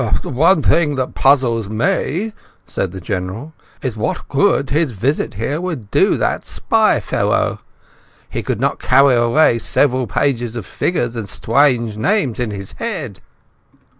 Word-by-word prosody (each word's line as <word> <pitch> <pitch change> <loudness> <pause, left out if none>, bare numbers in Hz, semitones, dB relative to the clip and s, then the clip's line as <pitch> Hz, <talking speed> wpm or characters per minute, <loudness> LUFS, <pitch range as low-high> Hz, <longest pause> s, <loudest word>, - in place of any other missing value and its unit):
"The - - -6
one 160 +5 +3
thing 150 -4 +3
that 130 -1 -2
puzzles 120 -6 +2
me," 160 - -1 0.3
said 95 -1 -3
the 95 - -7
General, 95 - -5 0.3
"is 130 -5 -2
what 155 +11 -3
good 140 -2 +2
his 150 -3 +1
visit 130 +7 -1
here 135 - -2
would 155 - -5
do - - +3
that - - -1
spy - - +2
fellow? - - 0 0.7
He - - -4
could - - -3
not - - 0
carry 135 +1 +4
away 120 +1 +3
several 130 +1 +1
pages 120 +1 -1
of 115 -6 -5
figures 120 - -1
and 110 -4 -5
strange 120 -3 +1
names 140 - 0
in 120 -2 -1
his 100 -2 -7
head." 155 - -4
125 Hz, 150 wpm, -18 LUFS, 110-145 Hz, 0.7 s, carry